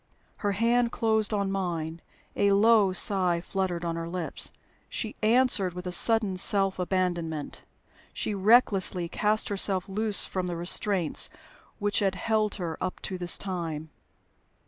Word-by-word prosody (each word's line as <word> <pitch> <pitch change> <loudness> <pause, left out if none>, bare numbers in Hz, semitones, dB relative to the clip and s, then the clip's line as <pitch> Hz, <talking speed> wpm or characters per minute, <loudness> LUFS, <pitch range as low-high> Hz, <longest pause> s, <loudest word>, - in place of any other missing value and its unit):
Her 205 -1 -2
hand 235 +3 +1
closed 220 -2 0
on 200 -2 -1
mine, 170 -4 -4 0.3
a 200 0 +2
low 210 -1 +4
sigh 185 -2 +2
fluttered 180 -1 -3
on 165 -1 -2
her 165 0 -5
lips. 175 -2 -1 0.4
She 220 - -4
answered 220 -5 +3
with 180 0 -7
a 180 - -4
sudden 210 0 +2
self 195 0 +3
abandonment; 175 -4 -3 0.5
she 215 - -3
recklessly 195 -4 +3
cast 210 +5 -1
herself 195 -1 +1
loose 210 +1 +1
from 185 -1 -4
the 175 - -4
restraints 175 0 +1 0.5
which 205 0 0
had 195 -2 0
held 215 +2 -1
her 170 -5 -5
up 185 - -4
to 185 -1 -5
this 175 -1 +2
time. 165 -5 -5
190 Hz, 145 wpm, -27 LUFS, 175-210 Hz, 0.5 s, low